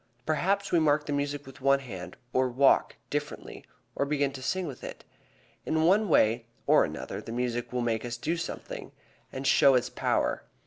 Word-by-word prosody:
Perhaps 195 Hz, +6 st, 0 dB
we 170 Hz, -, +4 dB
mark 150 Hz, -1 st, +2 dB
the 145 Hz, -, -2 dB
music 145 Hz, 0 st, -2 dB
with 135 Hz, 0 st, -12 dB
the 135 Hz, 0 st, +3 dB
hand, 115 Hz, -10 st, -8 dB, 0.2 s
or 130 Hz, 0 st, +2 dB
walk 135 Hz, +3 st, +3 dB, 0.2 s
differently, -, -, -4 dB, 0.3 s
or -, -, +1 dB
begin 140 Hz, -1 st, 0 dB
to 135 Hz, -1 st, -9 dB
sing 185 Hz, +7 st, -1 dB
with 140 Hz, -6 st, -8 dB
it. -, -, -8 dB, 0.6 s
In 160 Hz, 0 st, 0 dB
one 195 Hz, +4 st, +4 dB
way 115 Hz, -4 st, +3 dB, 0.2 s
or -, -, +5 dB
another -, -, -5 dB
the -, -, -8 dB
music 120 Hz, 0 st, -2 dB
will 125 Hz, 0 st, -1 dB
make 115 Hz, -2 st, -1 dB
us 120 Hz, -1 st, -4 dB
do 160 Hz, +7 st, -1 dB
something 165 Hz, -, -6 dB, 0.4 s
that 135 Hz, +1 st, -6 dB
shows 135 Hz, -1 st, +6 dB
its 125 Hz, -, -1 dB
power. -, -, 0 dB
140 Hz, 185 wpm, -28 LUFS, 125-155 Hz, 0.6 s, shows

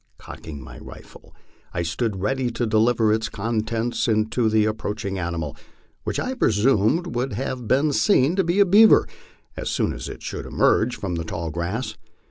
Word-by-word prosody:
Cocking 75 Hz, -3 st, -9 dB
my 65 Hz, -, -11 dB
rifle, -, -, -14 dB, 0.4 s
I 85 Hz, -, 0 dB
stood 95 Hz, +5 st, -2 dB
ready 125 Hz, +4 st, 0 dB
to 120 Hz, +1 st, -2 dB
deliver 110 Hz, 0 st, +3 dB
its 110 Hz, 0 st, -1 dB
contents 115 Hz, +1 st, -2 dB
into 110 Hz, +1 st, +1 dB
the 110 Hz, -1 st, +3 dB
approaching 105 Hz, -2 st, -3 dB
animal, 85 Hz, -4 st, -3 dB, 0.5 s
which -, -, -2 dB
I 255 Hz, -, -2 dB
presumed 130 Hz, -, +2 dB
would 125 Hz, +2 st, -2 dB, 0.3 s
be 140 Hz, +5 st, +2 dB
seen 150 Hz, 0 st, +3 dB
to 190 Hz, -, +2 dB
be 175 Hz, +3 st, 0 dB
a 200 Hz, -, +7 dB
beaver 210 Hz, +4 st, +6 dB, 0.5 s
as -, -, -4 dB
soon -, -, 0 dB
as -, -, -6 dB
it -, -, -9 dB
should -, -, -5 dB
emerge 115 Hz, +2 st, +2 dB
from 95 Hz, -3 st, -4 dB
the 85 Hz, -, -3 dB
tall 80 Hz, 0 st, -4 dB
grass. 90 Hz, -, -3 dB
110 Hz, 165 wpm, -23 LUFS, 100-130 Hz, 0.5 s, a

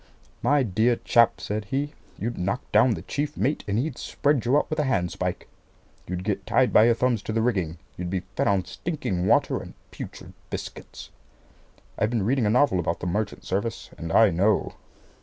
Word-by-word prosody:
"My 145 Hz, -1 st, +3 dB
dear 115 Hz, +3 st, +2 dB
chap," 115 Hz, 0 st, +3 dB
said 105 Hz, 0 st, -3 dB
he, 140 Hz, +7 st, -2 dB, 0.2 s
"you'd 120 Hz, +3 st, -3 dB
knock 100 Hz, +7 st, -2 dB
down 125 Hz, -4 st, +5 dB
the -, -, -8 dB
chief 150 Hz, +1 st, -3 dB
mate, 145 Hz, +4 st, 0 dB
and 100 Hz, +1 st, 0 dB
he'd 130 Hz, +2 st, -2 dB
spread 145 Hz, -4 st, 0 dB
you 130 Hz, +4 st, +4 dB
out -, -, +1 dB
with 155 Hz, -, -3 dB
a -, -, +3 dB
handspike. 90 Hz, -10 st, -1 dB, 0.6 s
You'd 90 Hz, 0 st, -4 dB
get 100 Hz, -2 st, -2 dB
tied 130 Hz, -1 st, +3 dB
by 110 Hz, -, +7 dB
your 120 Hz, 0 st, +4 dB
thumbs 120 Hz, -3 st, +1 dB
to -, -, -5 dB
the 115 Hz, +1 st, +1 dB
rigging. 95 Hz, -9 st, 0 dB, 0.2 s
You'd 90 Hz, 0 st, -4 dB
be 90 Hz, -1 st, -2 dB
fed -, -, +1 dB
on 100 Hz, -2 st, +2 dB
stinking 105 Hz, -, -3 dB
water -, -, +3 dB
and -, -, -11 dB, 0.2 s
putrid -, -, -9 dB, 0.2 s
biscuits. -, -, -7 dB, 0.9 s
I've 110 Hz, -, +2 dB
been 115 Hz, -5 st, 0 dB
reading 125 Hz, -1 st, +2 dB
a -, -, +2 dB
novel 125 Hz, -4 st, +3 dB
about 85 Hz, -1 st, -1 dB
the -, -, -5 dB
merchant 105 Hz, +4 st, -2 dB
service, 100 Hz, +5 st, -3 dB
and 85 Hz, -1 st, -6 dB
I 110 Hz, +1 st, +6 dB
know." 100 Hz, +5 st, +1 dB
110 Hz, 195 wpm, -25 LUFS, 95-125 Hz, 0.9 s, by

